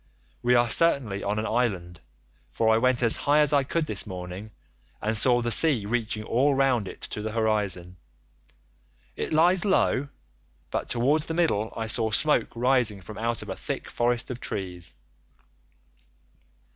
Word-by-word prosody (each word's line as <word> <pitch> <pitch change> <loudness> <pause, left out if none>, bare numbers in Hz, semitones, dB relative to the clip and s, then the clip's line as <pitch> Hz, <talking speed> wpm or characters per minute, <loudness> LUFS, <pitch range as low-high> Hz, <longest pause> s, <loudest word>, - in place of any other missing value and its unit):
We 125 0 +3
are 120 0 +3
certainly 120 -8 +2
on 100 +1 -2
an 110 - -2
island, 95 -8 -2 0.5
for 110 -1 +1
I 110 - +3
went 130 0 +1
as 115 - +6
high 145 +1 +2
as 150 -1 +4
I 140 -1 +3
could 160 +4 -2
this 145 - -1
morning, 90 +2 -7 0.5
and 110 +1 -2
saw 120 +2 +3
the 120 - -1
sea 135 -7 +3
reaching 110 -1 -2
all 135 +6 +1
round 130 -6 +1
it - - -10
to 105 - -5
the 110 0 -5
horizon; 100 -5 -1 1.2
it - - -4
lies 175 +3 +3
low, 145 -8 +1 0.6
but - - -3
towards 145 +6 +1
the 160 - -3
middle 110 -11 0
I 115 - -2
saw 110 0 +1
smoke 150 +8 +2
rising 120 -4 +2
from 105 +4 -10
out 115 +1 -2
of - - -11
a - - -4
thick - - -6
forest 120 0 -1
of 125 - -6
trees. 90 -6 -5
115 Hz, 165 wpm, -26 LUFS, 105-135 Hz, 1.2 s, as